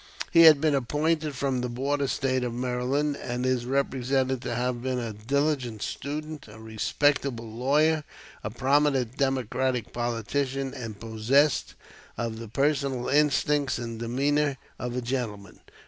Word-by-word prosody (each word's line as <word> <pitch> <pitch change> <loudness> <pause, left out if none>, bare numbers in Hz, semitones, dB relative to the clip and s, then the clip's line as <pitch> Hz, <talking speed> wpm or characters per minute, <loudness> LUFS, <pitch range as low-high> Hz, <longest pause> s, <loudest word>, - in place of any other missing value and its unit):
He 165 -1 +8
had 155 -3 +9
been 155 0 +2
appointed 150 +3 0
from 130 -1 -1
the 125 - -2
border 140 +3 -1
State 130 -1 0
of 120 -1 -3
Maryland, 130 +4 0
and 125 +1 -3
is 125 -2 0
represented 130 -1 0
to 120 - -3
have 125 0 -1
been 130 0 -1
a 115 -3 -3
diligent 125 0 -1
student, 150 0 -5
a 110 0 -12
respectable 115 +3 0
lawyer, 145 +7 +2 0.4
a - - -2
prominent 135 0 +1
Democratic 130 -2 0
politician, 130 +3 -2
and 115 -6 -7
possessed 120 +5 +1 0.4
of 115 -1 -3
the 115 - -7
personal 135 +1 0
instincts 145 -1 +2
and 115 -1 -5
demeanor 140 +4 +1 0.2
of 125 0 -4
a 125 - -1
gentleman. 115 -6 -4
130 Hz, 140 wpm, -27 LUFS, 120-140 Hz, 0.4 s, had